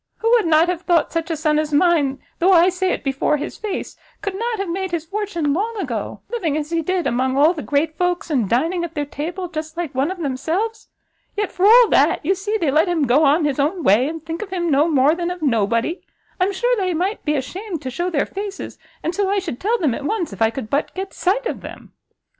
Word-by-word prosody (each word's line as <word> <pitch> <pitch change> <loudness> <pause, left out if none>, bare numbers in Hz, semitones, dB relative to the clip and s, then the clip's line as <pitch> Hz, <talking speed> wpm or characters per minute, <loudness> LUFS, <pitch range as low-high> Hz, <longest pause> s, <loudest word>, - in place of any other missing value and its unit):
Who 455 - 0
would 460 -7 +4
not 320 +1 +4
have 355 -1 -2
thought 345 -3 +2
such 330 0 -2
a 325 - 0
son 305 -1 +2
as 305 -1 -2
mine, 290 -3 +2 0.2
though 365 +3 +4
I 350 +1 +6
say 370 0 -1
it - - -3
before 275 +2 +1
his 295 - -6
face, 420 -3 -4 0.3
could 400 - -2
not 460 +3 -2
have 395 -1 -3
made 375 +2 -2
his 340 -2 -3
fortune 345 -6 -2
long 435 +7 -2
ago, 250 - -4
living 340 -11 -1
as 305 +1 -4
he 335 -1 +1
did, 365 +2 -1
among 260 +2 0
all 305 +5 +5
the 315 - -6
great 305 +3 0
folks, 355 -2 0
and 240 -9 +1
dining 330 +9 +1
at 340 -1 -6
their 295 -1 -1
table 340 +6 -5
just 315 -1 -6
like 340 -5 -3
one 270 +4 0
of 375 - -4
themselves? 340 - -2 0.5
yet, 415 -1 -1
for 375 +2 +2
all 475 +2 +8
that, - - +3
you 385 - +3
see 410 +3 -2
they 325 -9 0
let 310 +6 +3
him 325 -5 +1
go 265 +5 +4
on 295 +3 +3
his 285 -1 -1
own 320 +5 0
way, 220 +7 +4
and 320 0 -6
think 330 0 -5
of 425 - -6
him 345 -3 -1
no 290 +3 +4
more 290 -2 +4
than 345 0 -2
of 355 -2 -6
nobody! 230 - +1 0.4
I'm 370 +2 +2
sure 485 +6 +1
they 370 -4 0
might 375 +6 -2
be 300 0 0
ashamed 355 +5 -5
to 260 - -4
shew 345 +8 -2
their 300 -5 0
faces, 395 0 -6 0.2
and 330 - -1
so 400 0 0
I 400 - +1
should 345 -11 -3
tell 450 +5 +1
them 305 - +1
at 280 - -5
once, 345 - -2
if 195 - -11
I 225 - +5
could 230 -2 -7
but 285 - -1
get 385 +1 -5
sight 415 +7 0
of - - -3
them." - - -11
335 Hz, 250 wpm, -20 LUFS, 290-380 Hz, 0.5 s, all